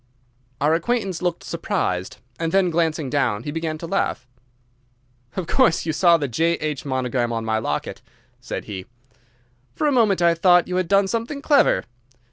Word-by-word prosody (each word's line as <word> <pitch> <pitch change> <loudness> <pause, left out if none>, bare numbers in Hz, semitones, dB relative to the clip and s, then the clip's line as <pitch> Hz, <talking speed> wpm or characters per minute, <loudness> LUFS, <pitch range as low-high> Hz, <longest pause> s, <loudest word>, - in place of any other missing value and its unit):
Our 150 +2 +2
acquaintance 190 0 -1
looked 175 -1 -2
surprised, 105 - -2 0.2
and 165 -1 -1
then, 190 -1 +3
glancing 160 -3 0
down, 125 -6 0
he 145 - -4
began 160 0 -3
to 170 - -7
laugh. 165 -7 -2 1.1
"Of 185 - -2
course 200 -2 +2
you 160 - -1
saw 170 +1 +5
the 145 -3 -2
'J.H.' 155 +2 -1
monogram 125 -3 -1
on 115 -1 -3
my 110 0 0
locket," 75 -8 -3 0.4
said - - -6
he. 95 -2 -7 0.9
"For - - -1
a 295 - +3
moment 220 -8 +3
I 170 -1 +4
thought 175 +1 +4
you 180 - -2
had 185 -2 0
done 195 +1 +3
something 230 +7 -3
clever. 280 - +4
165 Hz, 165 wpm, -22 LUFS, 130-185 Hz, 1.1 s, saw